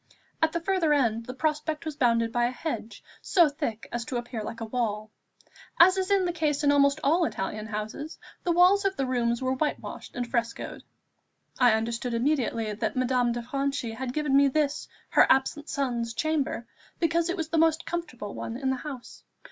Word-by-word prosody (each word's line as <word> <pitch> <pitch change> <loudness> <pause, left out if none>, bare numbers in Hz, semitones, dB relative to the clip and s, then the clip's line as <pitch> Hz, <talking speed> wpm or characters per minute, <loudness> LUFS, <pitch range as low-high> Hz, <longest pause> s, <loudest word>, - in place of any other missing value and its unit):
At 320 0 +3
the 340 - -1
further 340 -3 +1
end 230 -4 0
the 255 - -5
prospect 305 +2 -1
was 310 -2 -4
bounded 230 -4 +2
by 240 0 +2
a - - +1
hedge, 245 -5 -5 0.2
so 345 -4 +4
thick 280 -7 -4
as 240 0 -2
to 260 -4 -3
appear 240 -1 -5
like 225 - -6
a 225 - -4
wall. 215 -2 -2 0.7
As 365 +3 +8
is 380 -1 -1
the 380 -3 +2
case 300 -3 0
in 285 - +5
almost 280 +1 +4
all 330 +6 +3
Italian 215 -6 -3
houses, 220 +9 -5 0.3
the 350 - +1
walls 365 +4 +5
of 390 -1 0
the 270 - 0
rooms 240 -1 0
were 260 0 +1
white 295 +3 -1
washed - - -9
and 245 -1 -2
frescoed. 235 -1 -3 0.8
I 245 -3 +6
understood 235 +2 -1
immediately 230 -4 0
that 220 +1 -2
Madame 250 -1 +2
de 240 0 -3
Franchi 275 -1 -2
had 245 +2 -4
given 295 0 0
me 280 0 +6
this, 290 +1 0 0.2
her - - +5
absent 285 +3 +1
son's 240 -5 -2
chamber, 305 -6 -1 0.3
because 335 0 +1
it 360 - -1
was 320 -2 -3
the 330 - +1
most 325 0 +3
comfortable 280 -12 -5
one 230 - -5
in 265 0 0
the 265 - -1
house. 270 -3 -9
270 Hz, 195 wpm, -27 LUFS, 235-310 Hz, 0.8 s, As